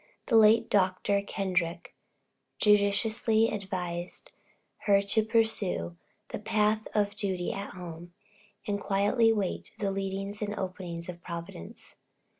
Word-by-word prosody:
The 230 - +1
late 220 +1 +6
Dr. 200 +1 +2
Kendrick 180 -4 -2 0.6
judiciously 215 +2 +3
advised 180 -3 -4 0.6
her 200 -1 +6
to 200 +2 +2
pursue 220 - +1 0.3
the - - -5
path 215 0 +1
of 205 -1 +2
duty 190 -4 -1
at 200 -1 -6
home, 175 -1 -9 0.5
and 200 -1 -2
quietly 210 +4 +3
wait 205 -4 -2
the 200 -2 -1
leadings 195 +1 -3
and 210 0 -2
openings 180 -3 -5
of 175 -1 -8
Providence. 170 - -8
200 Hz, 115 wpm, -29 LUFS, 180-210 Hz, 0.6 s, late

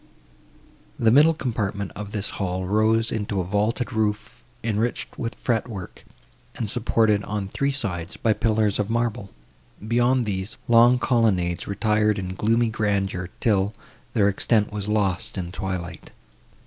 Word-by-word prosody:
The 115 -1 +3
middle 150 +6 +6
compartment 100 - -3
of 105 0 -7
this 105 -1 -2
hall 95 -1 -2
rose 110 +3 +2
into 105 -2 -2
a - - 0
vaulted 105 +7 -1
roof, 105 -1 -2 0.2
enriched 115 +1 -2
with 115 0 -3
fretwork, 115 -6 -3 0.5
and 115 - -3
supported, 105 -1 +2
on 105 -1 -3
three 140 +8 -1
sides, 95 -10 -3
by 110 - +2
pillars 110 -2 +1
of 105 0 -1
marble; 115 -3 -1 0.6
beyond 120 +2 +2
these, 100 +3 -3
long 120 +1 +6
colonnades 100 -9 +1
retired 105 +1 +1
in 95 -1 -4
gloomy 115 +4 +2
grandeur, 100 -4 -1
till 100 -2 +1 0.4
their 100 -2 +4
extent 105 +2 +2
was 105 -1 -4
lost 100 -3 0
in 90 -2 -4
twilight. 95 -3 -5
105 Hz, 135 wpm, -24 LUFS, 100-115 Hz, 0.6 s, middle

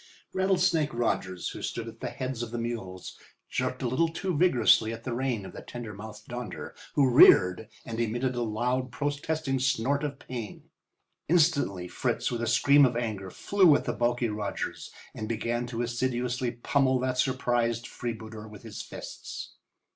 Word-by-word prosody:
Rattlesnake 185 -6 +2
Rogers, 95 -6 -1
who - - -8
stood - - -4
at - - -10
the - - -3
heads 130 -2 -4
of 120 - -3
the 120 - -4
mules, 115 -6 -5 0.3
jerked - - -1
a - - +1
little 130 +8 +2
too 175 +2 -2
vigorously 125 -9 +4
at 115 0 -7
the 125 - -3
rein 120 -5 -1
of - - -9
the - - -8
tender 120 -3 -7
mouthed 105 +1 -10
Donder, 120 -5 -6 0.2
who 140 -2 +5
reared 90 -1 +7 0.2
and 115 0 -5
emitted 120 +3 0
a 120 - -2
loud, 125 +3 -1
protesting 145 0 -1
snort 135 +2 +1
of 145 -2 -3
pain. 120 -6 -8 0.6
Instantly 145 - +2
Fritz, 90 - -1
with 120 -1 -2
a 120 - -1
scream 140 +5 +5
of 125 -3 +3
anger, 105 -5 -3
flew 185 - +4
at - - -1
the - - -1
bulky 120 0 +1
Rogers 105 -1 -4 0.2
and 110 - -5
began 120 +1 -1
to 120 0 -2
assiduously 125 +1 -1
pummel 130 +2 +1
that 130 0 -1
surprised 120 -3 +1
freebooter 110 -2 -6
with 105 -2 -12
his - - -7
fists. - - -8
120 Hz, 170 wpm, -28 LUFS, 110-135 Hz, 0.6 s, reared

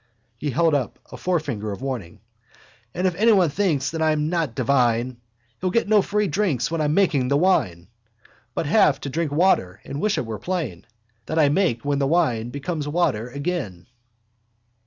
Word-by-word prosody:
_ - - -40 0.4
He 150 - -2
held 165 +4 +2
up 140 -4 -1
a - - -7
forefinger 140 - -2
of 100 +6 -7
warning. 110 -8 -5 0.7
_—If 180 0 +1
anyone 195 -4 +4
thinks 155 -6 0
that 160 0 -4
I 160 0 +3
amn't 155 -3 -1
divine 125 -2 +1 0.4
He'll 185 - 0
get 230 +4 +1
no 210 -1 +5
free 210 +1 0
drinks 160 - 0
when 165 -1 -1
I'm 150 0 +1
making 160 -10 +2
the 140 +2 +2
wine 90 - +1 0.7
But - - -1
have 150 -3 +4
to 140 - -4
drink 160 0 -1
water 145 - +2
and 140 +2 -6
wish 215 -1 +1
it - - -1
were 110 -2 -5
plain 155 - -4 0.4
That 160 - -3
I 150 -3 +5
make 145 - +1
when 140 -1 0
the 140 - +1
wine 125 -8 +1
becomes 150 +3 -4
water 145 -8 0
again. 140 - -4
150 Hz, 180 wpm, -23 LUFS, 125-175 Hz, 0.7 s, no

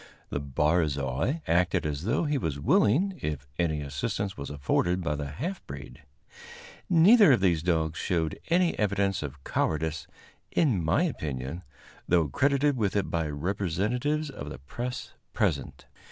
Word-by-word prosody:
The - - -1
barzoi 75 - 0
acted 85 0 +2
as 75 +2 -3
though 115 - +1
he 145 -3 0
was 75 - -2
willing 170 - +2
if 75 -3 -3
any 80 -3 +1
assistance 95 - -3
was 70 - -6
afforded 85 +5 0
by 75 - 0
the 75 -1 -3
half 165 - -5
breed. - - -9 0.9
Neither 185 - +7
of 120 - +3
these 90 -4 +2
dogs 80 -2 0
showed 80 -3 -1
any 175 0 +3
evidence 100 -2 +1
of 70 -2 -7
cowardice, 80 -2 -1 0.4
in 125 - +2
my 80 - +2
opinion, 75 - -3 0.5
though 85 -4 +3
credited 140 - +2
with 105 -4 0
it 100 - 0
by 80 -2 0
representatives 100 - -1
of 75 - -7
the - - -7
press 120 - -6 0.2
present. - - -1
90 Hz, 145 wpm, -28 LUFS, 75-125 Hz, 0.9 s, Neither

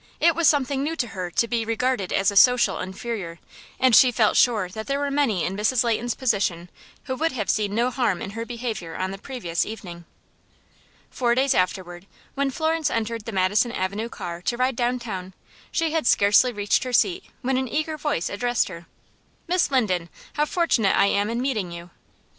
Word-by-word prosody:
It 335 - +4
was 335 -1 +3
something 280 -2 +2
new 310 +3 -2
to 250 -7 -2
her 185 -4 -5
to 235 +6 0
be 230 -1 -1
regarded 230 -3 -1
as 195 +1 +2
a - - -8
social 250 +5 +5
inferior, 190 -2 -5 0.4
and 255 -3 +5
she 255 +2 +7
felt 220 -2 +2
sure 220 -7 +3
that 220 +4 -8
there 275 0 0
were 285 0 -2
many 260 - +1
in 190 - -2
Mrs. 220 +4 +2
Leighton's 235 +1 -1
position 190 -8 -1 0.3
who 260 - -4
would 320 +2 -1
have 215 -6 0
seen 205 -1 -1
no 240 +2 +1
harm 235 -9 0
in 195 - -6
her 230 +2 -5
behavior 230 -8 -5
on 185 +1 -2
the 195 - -7
previous 200 -10 -3
evening. 175 -6 -8 1.1
Four 240 -2 +1
days 270 +1 +2
afterward, 180 0 -2 0.3
when 280 0 0
Florence 315 +2 0
entered 230 -1 -3
the 230 - -5
Madison 200 +4 +2
Avenue 205 +2 -3
car 170 -5 -7
to 240 +6 -2
ride 255 0 +1
downtown, 230 -7 -3 0.4
she 330 -2 0
had 320 -5 0
scarcely 205 +5 +5
reached 205 -2 0
her 255 -1 -5
seat 365 +8 +2 0.2
when 260 +1 +1
an 260 0 -1
eager 310 +4 -2
voice 295 - -2
addressed 240 +2 0
her: 170 -2 -10 0.6
"Miss 355 +1 +2
Linden, 185 -11 0 0.2
how 300 0 +1
fortunate 300 - +1
I - - +5
am 200 +1 +1
in 235 +1 -2
meeting 230 -9 -2
you!" 170 0 -9
230 Hz, 195 wpm, -24 LUFS, 195-260 Hz, 1.1 s, she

